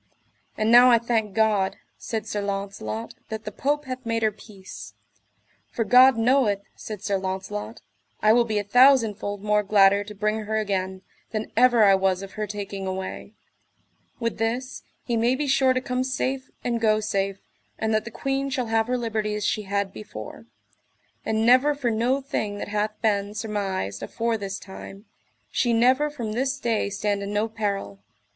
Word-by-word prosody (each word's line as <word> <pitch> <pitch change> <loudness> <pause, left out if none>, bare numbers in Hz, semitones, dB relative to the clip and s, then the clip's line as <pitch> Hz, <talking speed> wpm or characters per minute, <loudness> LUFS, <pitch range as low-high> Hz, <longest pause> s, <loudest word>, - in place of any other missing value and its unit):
And 215 +1 +1
now 245 +1 +9
I 235 - +7
thank 225 -3 -1
God, 215 -3 +2 0.2
said 220 -2 -4
Sir 210 -1 -3
Launcelot, 200 +3 -4 0.2
that 220 0 -6
the 210 - -4
Pope 290 +7 -1
hath 255 0 -6
made 230 -1 -1
her 215 - +3
peace; 195 -2 -12 0.7
for 230 - -1
God 250 +2 +6
knoweth, 225 -4 +2
said 210 -2 -8
Sir 200 -2 0
Launcelot, 190 +4 -5 0.4
I 215 +1 +5
will 240 +1 +5
be 220 -2 -2
a 205 - 0
thousandfold 220 -4 +3
more 210 0 +3
gladder 200 -1 +4
to 210 0 -9
bring 215 +1 -1
her 220 +1 -1
again, 190 -3 -2 0.3
than 220 -1 -4
ever 240 -1 +5
I 200 -1 +7
was 190 0 +1
of 195 - -8
her 215 0 -4
taking 200 -1 -5
away; 190 +2 -5 0.9
with 230 -3 -2
this, 245 +4 -2 0.3
I 235 -2 0
may 235 +3 +2
be 295 +3 -2
sure 265 -1 +3
to 255 - +1
come 250 0 -2
safe 260 0 -2
and 235 -2 -1
go 215 -1 +3
safe, 195 -2 -1 0.4
and 220 0 -1
that 215 0 +1
the 235 - -7
queen 270 +3 -2
shall 260 -2 -1
have 225 0 +2
her 250 0 0
liberty 215 -3 -2
as 210 -1 -3
she 215 - 0
had 200 -1 -1
before; 110 - -9 0.8
and 220 0 0
never 260 +5 +5
for 255 -5 -1
no 245 +5 +1
thing 210 -6 -3
that 205 - -5
hath 210 +1 -2
been 205 -1 0
surmised 195 - -3
afore 230 0 -1
this 195 -1 -4
time, 195 +1 -11 0.5
she 240 -2 +1
never 255 +6 +3
from 240 -7 -5
this 265 +4 -1
day 230 -5 0
stand 205 0 -1
in 200 0 -4
no 210 +2 0
peril. 200 - -3
215 Hz, 180 wpm, -25 LUFS, 200-240 Hz, 0.9 s, now